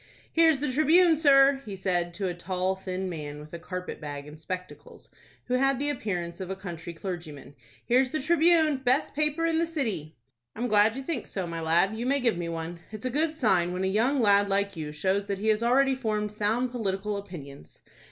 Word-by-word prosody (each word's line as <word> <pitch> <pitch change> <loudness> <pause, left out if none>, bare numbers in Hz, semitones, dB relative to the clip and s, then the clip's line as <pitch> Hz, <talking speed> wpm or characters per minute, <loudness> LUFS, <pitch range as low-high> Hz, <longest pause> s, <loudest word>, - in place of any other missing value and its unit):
"Here's 325 -2 +5
the 275 -1 -2
'Tribune', 320 +5 +5
sir," 275 -3 +5
he 205 -3 -7
said 175 -2 -1
to 195 0 -2
a 180 - -2
tall, 185 +2 -2
thin 190 0 -4
man, 150 -4 -6
with 150 +1 -12
a 170 - -5
carpet 180 +1 -6
bag 145 -1 -6
and 155 +1 -12
spectacles, 180 +2 -8 0.4
who 250 - -3
had 270 +1 +3
the 290 +2 -1
appearance 175 -9 -4
of 185 - -5
a 190 - -3
country 175 -3 -7
clergyman. 165 -6 -7 0.3
"Here's 255 +2 +3
the 310 - -2
'Tribune,'—best 310 -4 +3
paper 305 +2 0
in 325 -1 +1
the 335 - +1
city." 215 - -3 0.4
"I'm 240 +3 -2
glad 215 0 +4
you 270 - -5
think 275 -4 -4
so, 190 -3 -4
my 165 -1 -5
lad. 170 +6 +2
You 235 +3 -3
may 280 +1 +2
give 240 -5 +1
me 170 -1 -3
one. 165 +1 -5
It's 215 +2 -7
a 255 - -1
good 310 +4 0
sign 185 - +2
when 185 +1 -2
a - - +1
young 240 +8 +2
lad 200 -1 +4
like 200 0 0
you 155 -2 -5
shows 190 +6 -1
that 200 - -2
he 215 +3 -1
has 215 0 +2
already 265 +3 +3
formed 215 -5 -2
sound 220 +4 0
political 210 -3 -2
opinions." 145 - -10
205 Hz, 210 wpm, -27 LUFS, 175-270 Hz, 0.4 s, Here's